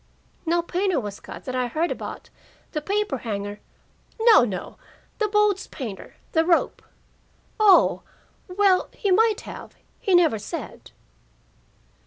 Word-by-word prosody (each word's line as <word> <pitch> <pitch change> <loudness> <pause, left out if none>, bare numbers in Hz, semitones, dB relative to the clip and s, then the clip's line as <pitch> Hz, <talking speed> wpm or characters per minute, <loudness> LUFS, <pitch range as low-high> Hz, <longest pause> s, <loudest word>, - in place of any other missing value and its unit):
"No 340 +1 +2
painter 365 -1 0
was 205 -4 -6
cut - - -11
that 255 - -4
I 255 -1 0
heard 315 +8 -1
about - - -7 0.4
The 305 - -3
paper 400 -5 -1
hanger 205 -2 -5 0.3
" - - -36
"No, 425 - +7
no. 190 -7 -5 0.4
The 430 - +2
boat's 420 -1 +2
painter 230 -9 -8 0.2
the 320 - +3
rope." 340 0 +1 0.8
"Oh! 410 -3 +5 0.5
Well, 375 0 +2
he 400 - -1
might 435 +2 +3
have. - - -10 0.2
He 385 - +2
never 320 -11 +4
said." 330 - -7
345 Hz, 135 wpm, -24 LUFS, 250-400 Hz, 0.8 s, No